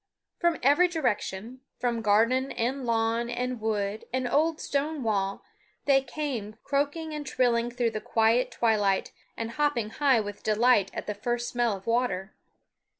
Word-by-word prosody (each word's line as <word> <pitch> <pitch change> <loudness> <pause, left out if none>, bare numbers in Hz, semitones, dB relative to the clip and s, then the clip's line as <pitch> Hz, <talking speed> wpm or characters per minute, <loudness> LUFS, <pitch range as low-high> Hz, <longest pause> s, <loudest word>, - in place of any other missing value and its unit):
From 345 -2 +2
every 290 +7 +5
direction, 245 - -2 0.2
from 240 -2 -1
garden 230 +6 +3
and 255 +3 -2
lawn 230 +1 +1
and 245 0 -3
wood 210 -1 -2
and 255 -1 -1
old 315 +4 +2
stone 285 0 -2
wall, 200 -3 -1 0.4
they 275 -1 +5
came 265 -8 -4
croaking 290 +3 -1
and 300 -1 -4
trilling 240 -3 +1
through 240 -1 0
the 215 -1 -4
quiet 225 +2 +2
twilight, 205 -4 +1 0.3
and 230 0 -3
hopping 275 -6 0
high 270 -2 +3
with 205 -1 -5
delight 215 -2 +3
at - - -4
the 210 - -2
first 240 +3 -2
smell 240 -4 0
of 190 - -16
water. 230 -5 0
240 Hz, 150 wpm, -27 LUFS, 220-275 Hz, 0.4 s, every